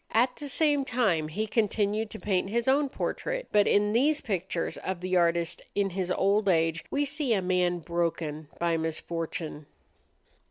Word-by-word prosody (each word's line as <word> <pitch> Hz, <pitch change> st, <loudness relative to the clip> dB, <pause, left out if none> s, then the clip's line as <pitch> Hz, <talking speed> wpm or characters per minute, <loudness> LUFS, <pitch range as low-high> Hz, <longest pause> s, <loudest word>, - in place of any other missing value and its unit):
At 245 Hz, +3 st, +3 dB
the 290 Hz, -, -5 dB
same 295 Hz, -2 st, +3 dB
time 210 Hz, -, +1 dB
he 210 Hz, +8 st, -2 dB
continued 215 Hz, 0 st, 0 dB
to 220 Hz, -, -9 dB
paint 190 Hz, -2 st, 0 dB
his 235 Hz, +3 st, -1 dB
own 280 Hz, +1 st, +3 dB
portrait; -, -, -3 dB
but 205 Hz, -1 st, +4 dB
in 205 Hz, +1 st, +3 dB
these 290 Hz, +6 st, +3 dB
pictures 185 Hz, -5 st, -3 dB
of 190 Hz, -2 st, -4 dB
the 185 Hz, +1 st, -1 dB
artist 170 Hz, -1 st, +1 dB
in 200 Hz, -1 st, +1 dB
his 185 Hz, 0 st, -2 dB
old 200 Hz, +2 st, +2 dB
age 165 Hz, -1 st, +2 dB
we 290 Hz, +1 st, 0 dB
see 285 Hz, -4 st, 0 dB
a -, -, +1 dB
man 180 Hz, -1 st, +1 dB
broken 165 Hz, -3 st, -2 dB
by 170 Hz, -1 st, +1 dB
misfortune. 160 Hz, -1 st, -4 dB
195 Hz, 165 wpm, -28 LUFS, 170-235 Hz, -, but